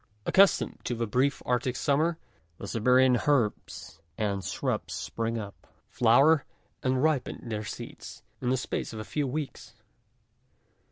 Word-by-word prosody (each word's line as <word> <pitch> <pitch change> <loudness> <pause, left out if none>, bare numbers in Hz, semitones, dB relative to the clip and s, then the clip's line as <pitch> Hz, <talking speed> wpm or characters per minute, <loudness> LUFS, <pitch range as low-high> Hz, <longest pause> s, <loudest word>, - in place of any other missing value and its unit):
Accustomed 195 0 +4
to 120 - -1
the 115 0 -1
brief 130 +5 0
arctic 125 +1 0
summer, 155 +5 +1 0.4
the - - -7
Siberian 125 +2 +4
herbs 115 - -1 0.2
and 100 -3 -1
shrubs - - -2
spring 115 0 -3
up, 100 -3 -8 0.2
flower, 135 +6 +5 0.4
and 130 +1 +1
ripen 145 -5 -1
their 110 -1 -3
seeds, - - -8 0.2
in 125 - -1
the 130 - +2
space 125 - -4
of 110 - -6
a - - -4
few 145 +4 -2
weeks. 130 -5 -5
125 Hz, 135 wpm, -28 LUFS, 115-140 Hz, 0.4 s, flower